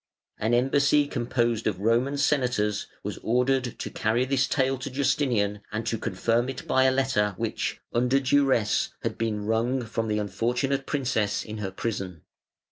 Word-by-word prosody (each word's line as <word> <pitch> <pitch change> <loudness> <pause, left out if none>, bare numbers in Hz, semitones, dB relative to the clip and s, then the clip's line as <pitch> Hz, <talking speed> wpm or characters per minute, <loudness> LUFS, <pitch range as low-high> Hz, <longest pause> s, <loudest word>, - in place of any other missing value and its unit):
An 110 +3 +2
embassy 140 +3 +3
composed 120 -4 -1
of 100 -4 -1
Roman 120 +7 +1
Senators 125 -8 +1 0.2
was - - -5
ordered 125 +1 +1
to - - -5
carry 115 +3 +1
this 135 0 +1
tale 135 -1 +1
to 135 - -5
Justinian 125 -7 0
and 110 +2 -3
to 115 -1 -1
confirm 115 +4 0
it 135 - -6
by 130 0 +3
a 130 - +5
letter 130 -7 +1
which, - - -2
under 125 +3 +3
duresse, 135 -5 +2
had - - -2
been 105 -2 -1
wrung 120 +4 0
from 115 0 -2
the 105 -1 0
unfortunate 120 +7 -1
princess 110 -7 0
in 110 0 -6
her 100 -2 -3
prison. 95 -4 -4
120 Hz, 160 wpm, -26 LUFS, 110-135 Hz, 0.2 s, a